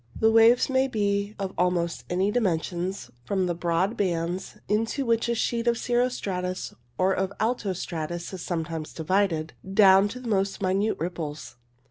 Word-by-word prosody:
The 220 0 +4
waves 225 +2 +6
may 265 0 +2
be 205 -3 -1
of 195 -1 -4
almost 175 -1 0
any 185 +3 +1
dimensions, 180 - -1
from 190 +7 0
the 175 - 0
broad 175 +5 0
bands 175 -1 -2
into 225 +6 0
which 230 0 +1
a 235 - +1
sheet 235 +1 -1
of 235 0 +3
cirro 245 +1 +1
stratus 185 -6 -4 0.2
or 185 +1 +3
of 190 0 -1
alto 220 -3 0
stratus 170 0 -5
is 185 - -6
sometimes 165 -2 -4
divided, 165 -1 0 0.2
down 195 -1 +7
to 250 +5 -7
the 250 - -8
most 195 -2 0
minute 195 +4 +1
ripples. 155 -7 -5
190 Hz, 160 wpm, -26 LUFS, 175-220 Hz, 0.2 s, down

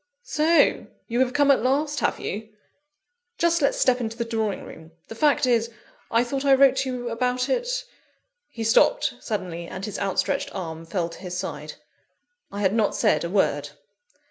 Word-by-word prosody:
"So 325 -2 +3 0.2
you 235 +1 -1
have 255 -1 +2
come 285 -1 +4
at 270 - +3
last, 285 +4 0
have - - 0
you? 215 +2 -5 0.9
Just 340 -1 +2
let's 280 - +2
step 250 -1 +3
into 225 -1 -4
the 235 - -2
drawing 220 -3 -2
room: 160 0 -13 0.2
the - - -6
fact 285 +3 +2
is 235 -2 +2 0.4
I 230 +1 +3
thought 270 +2 -3
I 275 -1 +5
wrote 265 -1 +5
to 265 0 0
you 245 -1 -4
about 250 +2 0
it - - 0 0.5
?" - - -45 0.3
He 230 - -6
stopped 245 - +3
suddenly, 180 -6 -4
and 185 +2 -6
his 210 - -5
outstretched 195 -1 -1
arm 165 -3 -6
fell 170 -2 -2
to 170 - -11
his 180 -1 -6
side. 185 - -5 0.8
I 200 - -5
had 190 -1 +2
not 220 -2 +1
said - - +2
a 170 - -3
word. 195 +1 +1
230 Hz, 185 wpm, -24 LUFS, 200-270 Hz, 0.9 s, I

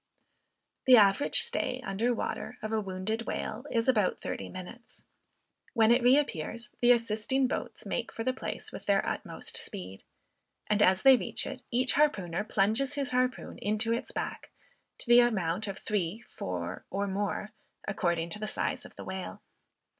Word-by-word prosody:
The 255 -1 +9
average 205 +6 +5
stay 265 - -1
under 210 +5 0
water 245 +1 -3
of 215 - -3
a 220 -1 +1
wounded 200 +4 -3
whale 245 +7 -4
is 230 0 0
about 215 -7 +2
thirty - - -5
minutes. 190 +6 -10 0.7
When 225 -1 +5
it 240 +2 +5
reappears, 240 - +1
the 245 0 +5
assisting 230 +3 +2
boats - - -5
make - - -3
for 225 - -5
the 255 - +1
place - - -6
with - - -9
their 200 -1 +3
utmost - - -4
speed, 95 +1 -6 0.6
and 210 0 +1
as 190 -1 +4
they 270 -1 +8
reach - - -1
it, - - -6
each 255 +2 +2
harpooner 210 - +1
plunges 220 +7 +1
his 280 -2 -1
harpoon 255 0 -1
into 215 +2 0
its 235 - -3
back, - - -4 0.5
to - - -3
the 240 0 +8
amount 210 -4 +1
of 195 - -4
three, 205 0 -2
four, 90 0 -5
or 200 +1 -1
more, 205 +2 -2 0.4
according 170 -4 0
to 210 - -4
the 215 - -3
size - - -2
of - - -13
the - - -8
whale. 190 -1 -6
215 Hz, 165 wpm, -30 LUFS, 195-245 Hz, 0.7 s, The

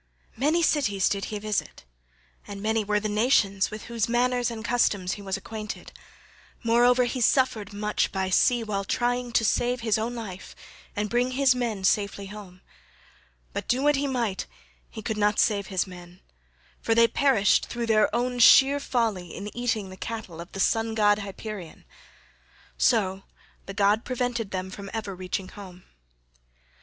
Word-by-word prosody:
Many 310 +7 +1
cities 205 - +2
did 200 -1 -1
he 210 - -4
visit, 210 0 -3 0.6
and 200 -1 -7
many 220 +1 0
were 210 0 +1
the 215 - -3
nations 210 -3 +2
with 215 0 -8
whose 235 -1 -2
manners 245 0 +1
and 225 -1 -7
customs 205 -6 +1
he 205 - -5
was 195 -1 -3
acquainted; 215 +1 -7 0.7
moreover 245 +2 +4
he 250 +1 -3
suffered 230 -5 +2
much 210 +1 -1
by 190 -1 -2
sea 240 +5 +3
while 200 -2 -2
trying 245 +3 -1
to 225 - +3
save 245 +2 +1
his 220 -2 +1
own 235 +2 -3
life 200 -5 -8 0.4
and 205 +1 -1
bring 245 +3 0
his 265 -1 +4
men 235 -6 -3
safely 200 +1 +1
home; 195 -3 -11 0.9
but - - -4
do 255 +3 +1
what 295 0 +4
he 280 +1 -1
might 235 -7 -2 0.4
he 220 - -9
could 220 0 -3
not 210 0 +2
save 200 -3 +2
his 190 -2 0
men, 180 -1 -12 0.6
for 225 - +1
they 230 0 +6
perished 230 -6 +3
through 235 0 -3
their 215 -2 +3
own 245 +2 -1
sheer 270 +4 +7
folly 220 - -2
in 205 +3 -7
eating 225 -5 -2
the 185 - -10
cattle 215 -8 -6
of 175 - -11
the 195 - -6
Sun 225 +2 +1
god 205 -1 +3
Hyperion; 200 -3 -8 0.9
so 195 -5 +2 0.5
the 195 - -6
god 205 +3 +3
prevented 245 -4 -2
them 190 -1 -4
from 200 +1 -8
ever 210 -3 -4
reaching 185 +1 -4
home. 185 -3 -12
215 Hz, 165 wpm, -26 LUFS, 200-240 Hz, 0.9 s, sheer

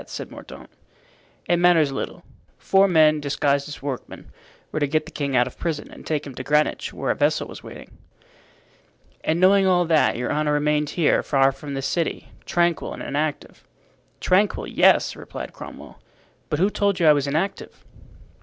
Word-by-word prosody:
said - - -7
Mordaunt. - - -12 0.7
"It 175 - +2
matters 170 -4 +4
little. 135 - -5 0.3
Four 195 +1 +3
men, 155 -4 +4
disguised 140 0 0
as 145 - -9
workmen, 135 -3 -7 0.4
were 155 - -2
to 145 - +1
get 155 +2 0
the 165 - -11
king 140 -4 -3
out 125 0 +4
of 130 - -10
prison 160 -3 -4
and - - -12
take 150 -2 -1
him 140 - -8
to 130 - -7
Greenwich, 150 +2 0
where - - -2
a - - -1
vessel - - +1
was - - -10
waiting." - - -12 1.2
"And 160 +2 0
knowing 195 +1 +5
all 175 -1 +3
that, 160 -7 +2
your 125 - -2
honor 150 0 0
remained 150 0 +1
here, 165 - +3
far 135 -1 +2
from 140 +1 -8
the 135 - -4
city, 155 +5 -2 0.2
tranquil 175 -1 0
and - - -8
inactive." 150 +1 -3 0.6
"Tranquil, 195 +3 +1
yes," - - +3
replied - - -8
Cromwell. - - -11 0.5
"But 150 - -1
who 190 +6 +2
told 200 -2 0
you 170 - +2
I 150 - +8
was 145 -1 -1
inactive?" 160 +8 -3
150 Hz, 175 wpm, -23 LUFS, 140-175 Hz, 1.2 s, I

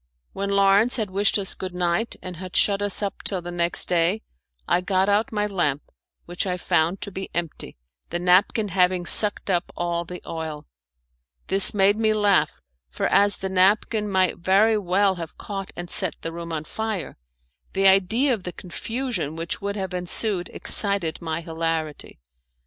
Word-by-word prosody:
When 200 +1 -3
Lawrence 200 +4 +4
had 215 -5 -2
wished 200 +2 +2
us 195 -2 -2
good 185 -1 -6
night 180 +6 -1
and 180 -2 -7
had 185 0 -9
shut 200 -1 +3
us 205 0 +2
up 200 - -4
till 190 - -1
the 175 0 -7
next 175 0 +1
day, 175 +4 +1 0.4
I 180 - +2
got 190 +1 +1
out 205 +2 +1
my 210 -1 0
lamp, 175 -8 -1 0.4
which 175 +3 -3
I 180 -1 -1
found 170 +1 0
to 200 - -6
be 190 0 -6
empty, 170 - -5 0.3
the 170 - -2
napkin 185 +4 +2
having 180 -1 +1
sucked 205 +1 +4
up 175 -1 -1
all 170 0 -1
the 180 +1 -8
oil. 160 -2 -6 0.8
This 195 +2 +3
made 200 +1 +3
me 220 -1 +2
laugh, 205 -2 +2 0.3
for - - -3
as 205 0 +3
the 190 - -4
napkin 205 +3 +2
might 185 -2 +1
very 200 +5 +3
well 195 -1 +1
have 165 -2 -8
caught 195 -2 -6
and 175 0 -6
set 180 0 +1
the 165 - -3
room 170 0 -7
on 155 -2 -3
fire, 220 +2 -4 0.6
the 195 0 0
idea 200 +8 +4
of 220 - -4
the 180 -1 -6
confusion 205 - -4
which 165 +1 -4
would 200 0 -3
have 190 -3 -4
ensued 180 +1 -1
excited 200 -6 +3
my 160 0 -3
hilarity. 160 - -4
190 Hz, 175 wpm, -23 LUFS, 175-205 Hz, 0.8 s, Lawrence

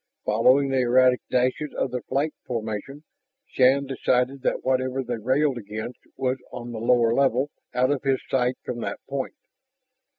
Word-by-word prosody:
Following 130 +6 +4
the 135 -1 +1
erratic 125 +1 +4
dashes 130 +4 0
of 130 - -1
their 125 -1 -3
flight 145 +6 -1
formation, 115 +4 -4 0.4
Shann 135 +2 +3
decided 130 0 0
that - - -1
whatever 130 0 0
they 120 -2 -4
railed 130 +3 +1
against 110 +3 -6 0.2
was 130 0 0
on 120 0 -7
the 115 - -5
lower 115 0 +3
level, 135 +1 +2 0.2
out 130 +2 +3
of 145 - 0
his 135 -2 +1
sight 125 -1 +1
from 120 - -4
that - - -3
point. 135 - -4
130 Hz, 160 wpm, -25 LUFS, 120-135 Hz, 0.4 s, Following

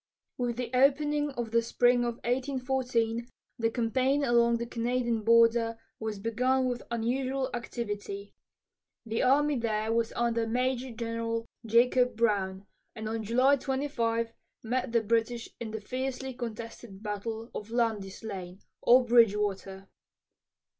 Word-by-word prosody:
With 240 -2 -2
the 245 -2 -3
opening 290 +3 +3
of 240 -3 -4
the 230 0 +4
spring 245 +1 +3
of 235 -1 -2
1814, 250 -2 0 0.3
the 225 0 +2
campaign 255 +5 +1
along 235 -2 +4
the 235 - -3
Canadian 235 -1 -1
border 230 0 +4 0.2
was 220 -1 -3
begun 250 +5 +1
with 245 -1 -2
unusual 255 +3 -1
activity. 205 -4 -5 0.7
The 225 0 -1
army 285 +1 +3
there 220 -1 0
was 230 0 +1
under 230 -1 +1
Major 255 +2 -1
General 230 0 -3 0.2
Jacob 245 +2 +4
Brown, 200 -4 0 0.3
and 220 -1 -5
on 225 +1 -2
July 255 +6 +3
25 235 -5 -1 0.3
met 245 +1 -1
the 230 -1 +2
British 230 +2 0
in 235 - -5
the 220 0 -5
fiercely 260 +3 -4
contested 230 -3 -7
battle 220 +2 -4
of 210 - -6
Lundy's 225 -5 -1
Lane, 185 -4 -6 0.2
or 250 +1 +6
Bridgewater. 205 -4 +2
235 Hz, 130 wpm, -29 LUFS, 225-250 Hz, 0.7 s, or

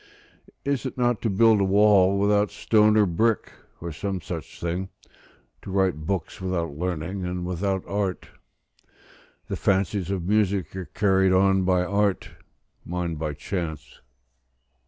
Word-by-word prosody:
Is 140 -2 0
it 130 - -8
not 120 -2 +1
to 115 - 0
build 110 +1 +4
a - - +4
wall 100 -1 +4
without 105 +1 +2
stone 110 -1 +3
or 105 - +5
brick, 110 +5 0 0.3
or 85 0 -5
some 95 +5 -3
such 85 -1 -7
thing, 90 +3 -3 0.7
to - - -9
write 95 -5 0
books 95 -2 -3
without 85 -5 -2
learning 90 +3 -3
and 90 0 -3
without 95 +1 -1
art? 100 -2 -3 1.2
The - - -3
fancies 95 -1 0
of 95 -3 -2
music 100 -4 +1
are 95 -1 -5
carried 95 -2 +2
on 95 0 +3
by 90 -1 +2
art; 100 0 0 0.5
mine 90 -1 -3
by 75 -1 -3
chance. 80 -4 -5
95 Hz, 140 wpm, -25 LUFS, 90-100 Hz, 1.2 s, or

